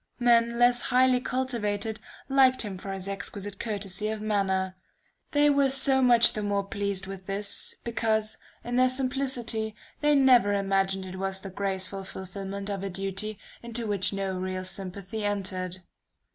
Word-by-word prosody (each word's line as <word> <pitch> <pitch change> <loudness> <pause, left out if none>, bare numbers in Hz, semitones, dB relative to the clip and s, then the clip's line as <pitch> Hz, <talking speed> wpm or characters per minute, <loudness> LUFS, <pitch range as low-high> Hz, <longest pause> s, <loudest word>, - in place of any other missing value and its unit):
Men 235 -1 +3
less 245 0 +4
highly 255 0 +3
cultivated, 225 -5 -2 0.3
liked 265 -2 +4
him 195 -4 -6
for 195 - -6
his 190 0 -5
exquisite 200 0 -5
courtesy 205 -2 -2
of 220 0 -2
manner. 190 -3 0 0.5
They 290 0 +4
were 280 -1 +3
so 265 0 +4
much 240 -2 +6
the 215 - -3
more 200 -1 0
pleased 200 -1 -2
with 190 -1 -8
this, 200 +1 -1
because, 220 -2 0 0.2
in 245 +1 -2
their 255 0 +5
simplicity, 255 -4 0 0.2
they 295 0 +3
never 250 -7 +5
imagined 195 -1 +1
it 185 0 -7
was 190 0 -2
the 195 - -7
graceful 195 0 -2
fulfillment 195 +1 -6
of 200 -2 -3
a 195 - -3
duty 195 +3 -4 0.2
into 235 0 -4
which 200 -3 +1
no 195 -2 -2
real 185 0 -3
sympathy 195 +3 -4
entered. 185 -3 -2
205 Hz, 155 wpm, -27 LUFS, 195-240 Hz, 0.5 s, much